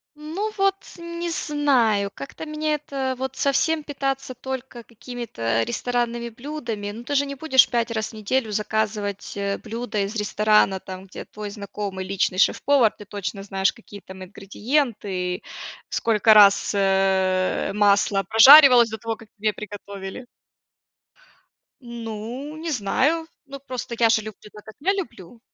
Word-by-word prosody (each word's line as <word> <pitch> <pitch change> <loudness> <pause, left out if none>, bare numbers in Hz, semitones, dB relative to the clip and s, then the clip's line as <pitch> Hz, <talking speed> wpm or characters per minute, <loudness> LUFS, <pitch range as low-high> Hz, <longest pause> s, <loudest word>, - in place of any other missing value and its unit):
Ну 335 +9 -4
вот, 390 0 +3 0.2
не 340 0 -5
знаю, 255 -11 +1
как-то 140 - -8
меня 305 0 -2
это 275 -3 -3
вот 265 0 -4
совсем 310 +3 +1
питаться 270 -2 -3
только 260 -1 -7
какими-то 220 - -3
ресторанными 240 - -2
блюдами, 235 -5 -6
но 230 +3 -9
ты 285 - -3
же 285 - +3
не 280 0 -6
будешь 265 -3 +4
5 235 -1 -1
раз 220 -1 -2
в - - -14
неделю 220 +2 -1
заказывать, 210 -1 -2
э, 200 0 -1
блюда 230 -1 -4
из 205 +3 -5
ресторана, 210 -2 +2
там, 185 0 -9
где 185 - -9
твой 210 -1 -8
знакомый, 200 -2 -6
личный 190 -1 -1
шеф-повар. 255 +1 +3
Ты 210 - -11
точно 200 0 -5
знаешь, 195 -1 0
какие 205 -3 -13
там 190 +1 -11
ингредиенты, 200 -2 -2 0.5
сколько 220 -1 +3
раз, 205 -2 +6
э, 190 -1 +1
масло 200 -1 +3
прожаривалось 250 +1 +9
до 220 - -5
того, 225 +1 -4
как 215 -1 -16
тебе 215 +1 0
приготовили. 200 +2 -8 1.6
Ну, 235 +5 -7
не 325 0 -4
знаю. 275 +8 +1 0.2
Ну, 275 0 -9
просто 255 -3 -6
я 230 -1 +5
же 220 -1 +3
люблю 215 0 -11
так, 210 -1 -13
как 220 - -12
я 385 +6 +2
люблю. 235 - -7
225 Hz, 145 wpm, -23 LUFS, 200-270 Hz, 1.6 s, прожаривалось